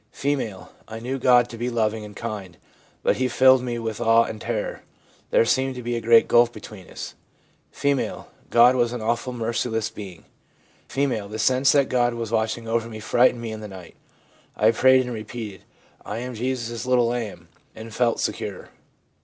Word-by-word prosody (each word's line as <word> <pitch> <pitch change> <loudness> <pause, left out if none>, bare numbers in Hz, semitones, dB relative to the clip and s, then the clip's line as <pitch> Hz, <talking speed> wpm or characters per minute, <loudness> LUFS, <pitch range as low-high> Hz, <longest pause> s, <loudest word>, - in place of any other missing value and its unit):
F. - - -12 0.5
' - - -30
I 110 0 -7
knew 130 +4 -4
God 125 -1 +5
to 115 - -9
be 120 +1 -1
loving 110 -2 -1
and 105 -1 -10
kind, 100 -7 -6 0.5
but - - +2
He 130 - +1
filled 130 0 +5
me 120 -1 -3
with 115 -1 -4
awe 115 0 +5
and 110 -2 -7
terror; 115 -3 -3 0.5
there - - +4
seemed 130 +2 +1
to 125 - -7
be 120 0 -2
a 115 - -2
great 115 0 +5
gulf 120 0 +5
between 105 -5 -11
us.' - - -7 0.6
F. 140 -2 -1
' - - -31
God 120 +2 +6
was 120 -1 +1
an 120 - -4
awful, 120 +3 -1
merciless 115 -1 -2
being.' 95 -6 -10 0.6
F. - - -12 0.3
'The 110 - -5
sense 130 +3 +3
that 140 -2 +3
God 120 -1 +1
was 115 -2 -4
watching 115 +1 -1
over 115 0 -1
me 110 -1 -8
frightened 120 +2 +2
me 115 -1 -5
in 110 - -6
the 105 - -7
night. 95 -4 -12 0.6
I 110 +2 +5
prayed 130 +3 +5
and 125 - -5
repeated, 110 -2 -7 0.2
" - - -34
I - - -5
am 125 +2 -5
Jesus' 120 -1 -3
little 125 -1 +3
lamb," 110 -8 -5 0.3
and 110 0 -9
felt 120 -1 +1
secure.' - - -4
115 Hz, 195 wpm, -24 LUFS, 110-125 Hz, 0.6 s, God